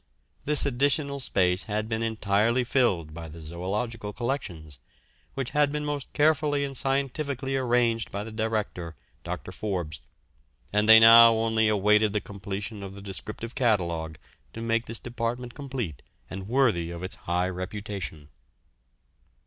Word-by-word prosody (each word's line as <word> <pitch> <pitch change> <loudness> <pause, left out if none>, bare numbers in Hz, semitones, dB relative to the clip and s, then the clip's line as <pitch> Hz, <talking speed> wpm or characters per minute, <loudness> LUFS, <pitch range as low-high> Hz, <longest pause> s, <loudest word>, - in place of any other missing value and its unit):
This 150 0 +3
additional 140 +1 +1
space 90 -7 +1
had 105 0 -2
been 110 0 -2
entirely 110 +2 +1
filled 100 - +1
by 85 0 -7
the 80 +1 -11
zoological 105 +7 -4
collections, 90 - -4 0.6
which 135 -2 -3
had 145 -1 +2
been 150 0 -3
most 145 -2 -4
carefully 150 -1 +2
and 135 -1 -6
scientifically 135 0 -1
arranged 120 -3 +1
by 100 +1 -3
the 110 - -8
director, 110 -7 -3 0.3
Dr. - - -5
Forbes, 90 -7 -4 0.7
and 105 +1 +2
they 110 0 +11
now 115 +1 +9
only 110 0 +2
awaited 105 0 +3
the 105 - +1
completion 100 +1 -6
of 95 0 -8
the 100 - -9
descriptive 105 +4 -6
catalogue 85 - 0 0.4
to 115 - -7
make 115 0 0
this 115 - -2
department 120 +1 -4
complete 130 - -5 0.3
and 95 0 -6
worthy 115 -10 +2
of 85 +1 -7
its 95 - -4 0.2
high 90 +1 +1
reputation. 95 -4 -6
110 Hz, 140 wpm, -27 LUFS, 95-125 Hz, 0.7 s, they